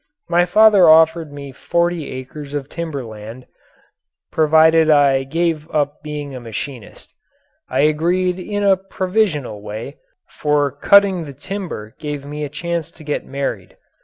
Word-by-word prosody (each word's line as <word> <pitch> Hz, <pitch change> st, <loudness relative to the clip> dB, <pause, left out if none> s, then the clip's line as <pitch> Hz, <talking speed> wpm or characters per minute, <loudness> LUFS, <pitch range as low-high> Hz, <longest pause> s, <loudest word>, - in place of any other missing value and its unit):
My 175 Hz, +1 st, +3 dB
father 205 Hz, -2 st, +6 dB
offered 160 Hz, 0 st, +4 dB
me 140 Hz, -1 st, -8 dB
forty 170 Hz, +3 st, -1 dB
acres 140 Hz, +3 st, -8 dB
of 140 Hz, -1 st, -4 dB
timber 160 Hz, -6 st, -5 dB
land, 110 Hz, +3 st, -10 dB, 0.9 s
provided 160 Hz, +1 st, +4 dB
I 140 Hz, -3 st, +4 dB
gave 160 Hz, +1 st, -1 dB
up 145 Hz, -1 st, -1 dB
being 150 Hz, -2 st, -6 dB
a 130 Hz, -, -6 dB
machinist. 120 Hz, +1 st, -8 dB, 0.6 s
I -, -, +1 dB
agreed 175 Hz, +5 st, +1 dB
in 205 Hz, +2 st, -3 dB
a 195 Hz, -1 st, +4 dB
provisional 185 Hz, -, -2 dB
way, 110 Hz, +7 st, -7 dB, 0.3 s
for 145 Hz, -2 st, 0 dB
cutting 190 Hz, +4 st, +4 dB
the 140 Hz, -, -9 dB
timber 155 Hz, -, -6 dB
gave 150 Hz, -2 st, -5 dB
me 150 Hz, +1 st, -5 dB
a 145 Hz, -, -4 dB
chance 170 Hz, +2 st, -4 dB
to 160 Hz, -, -16 dB
get 150 Hz, -1 st, -3 dB
married. 140 Hz, 0 st, -4 dB
150 Hz, 140 wpm, -19 LUFS, 140-170 Hz, 0.9 s, father